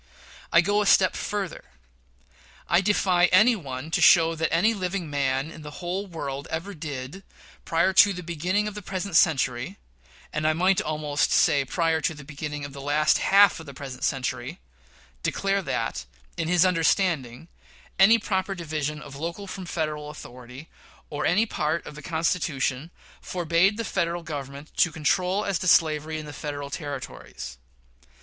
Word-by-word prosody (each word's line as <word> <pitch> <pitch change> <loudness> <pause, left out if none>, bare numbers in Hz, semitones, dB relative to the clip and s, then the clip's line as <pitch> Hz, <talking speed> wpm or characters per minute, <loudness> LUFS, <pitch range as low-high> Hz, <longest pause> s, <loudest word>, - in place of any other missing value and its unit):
I 170 - +6
go 205 +3 +1
a 205 - 0
step 185 -1 +5
further. 200 -3 -4 1.0
I 170 - +4
defy 185 -3 +3
any 210 +7 +5
one 140 -4 -7
to - - +1
show 165 -2 +6
that 160 0 -1
any 185 +8 +3
living 185 -5 -3
man 140 +1 -1
in 160 - -11
the 175 +6 -5
world 140 -4 -5
ever 170 +6 -4
did, 150 +1 -6 0.4
prior 170 +3 +2
to 200 +1 +7
the 180 -2 -6
beginning 180 +5 -1
of 210 - -5
the 210 - -7
present 195 +1 -4
century 125 - +2 0.6
(and 150 0 0
I 155 - +3
might 185 +4 +2
almost 150 -1 -1
say 145 -3 +4
prior 165 +2 0
to 160 - -1
the 150 - -11
beginning 145 0 -6
of 140 - -9
the 140 - -8
last 150 +2 +2
half 200 -1 +5
of 165 - -11
the 140 - -10
present 135 -2 -8
century), 125 -2 -2 0.6
declare 195 - 0
that, 115 - -3 0.3
in 165 - -2
his 180 +1 +4
understanding, 165 -6 +1 0.5
any 220 +4 +7
proper 195 -2 -2
division 150 -3 -4
of 140 -2 -11
local 170 +6 -5
from 185 -1 -7
Federal 155 -3 -3
authority, 125 +1 -11 0.4
or 150 0 -1
any 210 +6 +3
part 160 -5 -2
of - - -8
the 150 - -10
Constitution, 160 -3 -1 0.3
forbade 175 +3 +1
the 230 - -3
Federal 170 -2 -1
Government 145 -1 -7
to 175 - +4
control 180 +5 0
as 195 -4 0
to 185 - -3
slavery 155 -2 +3
in 155 - -6
the 145 - -9
Federal 145 -1 -6
Territories. 130 - -7
160 Hz, 165 wpm, -25 LUFS, 145-185 Hz, 1.0 s, to